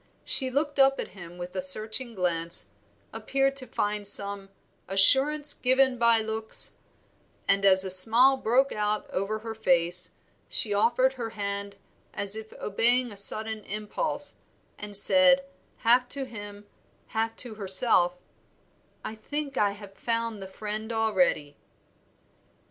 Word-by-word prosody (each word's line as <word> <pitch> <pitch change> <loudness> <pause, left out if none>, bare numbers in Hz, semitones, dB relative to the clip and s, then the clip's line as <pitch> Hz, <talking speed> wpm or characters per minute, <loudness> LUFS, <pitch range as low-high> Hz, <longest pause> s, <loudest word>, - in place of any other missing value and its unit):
She 260 - +2
looked 285 +2 -3
up 270 0 +3
at - - -6
him 175 -2 -14
with 180 +1 -10
a 185 - -3
searching 220 +6 +2
glance, 170 -2 -1 0.4
appeared 270 +5 -2
to 255 -2 -8
find 210 -2 -3
some 200 -1 +2 0.4
'assurance 280 +9 +4
given 260 0 0
by 235 -1 +4
looks,' 220 0 0 0.7
and 195 0 0
as 190 0 +5
a 190 - -4
smile 230 +8 +5
broke 260 +2 -1
over 210 -1 -4
her 225 - -6
face 180 -4 +1 0.4
she 210 - +4
offered 240 +5 0
her 240 -3 -7
hand 200 -1 -6 0.4
as 200 +1 +3
if 220 0 -10
obeying 240 +4 -1
a - - -12
sudden 215 +2 +3
impulse, 215 - -2 0.4
and 205 -1 +1
said, 275 +4 +4 0.4
half 245 +2 +3
to 275 -1 -1
him, 205 -4 -12 0.4
half 225 0 -4
to 245 -3 -4
herself 190 -3 +2 0.9
"I - - -7
think 280 +6 -8
I 205 -4 -1
have 205 -1 -14
found 230 0 -5
the 190 - -9
friend 215 +3 -7
already." 185 -10 -2
220 Hz, 135 wpm, -25 LUFS, 200-250 Hz, 0.9 s, as